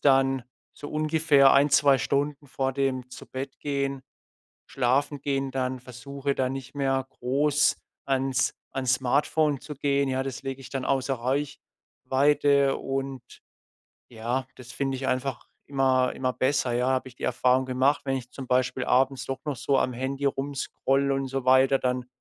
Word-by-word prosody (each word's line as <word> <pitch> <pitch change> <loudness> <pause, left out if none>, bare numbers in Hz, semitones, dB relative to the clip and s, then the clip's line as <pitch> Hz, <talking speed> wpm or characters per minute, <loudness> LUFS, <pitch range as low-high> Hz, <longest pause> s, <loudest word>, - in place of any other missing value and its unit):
dann 135 -2 +3 0.3
so 145 - -9
ungefähr 155 -3 +4
1, 140 +2 +4
2 140 -1 +5
Stunden 145 +3 -1
vor 135 0 -2
dem 130 -2 -1
Zubettgehen 140 +1 -4 0.6
Schlafengehen 135 +1 0
dann 130 -1 -2
versuche, 140 +3 -4
da 130 -1 0
nicht 135 0 -7
mehr 135 -2 0
groß 140 +3 +1 0.3
ans 130 -2 0 0.2
ans 130 -1 +1
Smartphone 145 +3 +1
zu 150 - -8
gehen. 140 0 +1
Ja, 130 0 0
das 135 -1 -5
lege 135 0 -5
ich 130 - -10
dann 135 -2 -3
außer 135 0 0
Reichweite 140 +2 0
und 135 -1 -4 0.9
ja, 120 +3 -2
das 120 -1 -11
finde 135 0 -2
ich 130 +1 -4
einfach 130 -1 -2 0.2
immer 130 -2 +2
immer 130 -1 -1
besser, 130 -1 +1
ja? 125 +1 +1
Habe 130 0 0
ich 125 - -16
die - - -12
Erfahrung 125 +1 +2
gemacht, 130 +3 +1
wenn 135 -1 0
ich 125 -1 -7
zum 130 +1 -8
Beispiel 130 0 +1
abends 130 0 +2
doch 135 - -3
noch 150 -2 -2
so 135 +3 +1
am 130 - +1
Handy 135 +3 -3
rumscrolle 140 0 0
und 135 0 -2
so 135 0 -3
weiter, 130 +1 +5
dann 125 -1 -1
135 Hz, 155 wpm, -26 LUFS, 130-140 Hz, 0.9 s, 2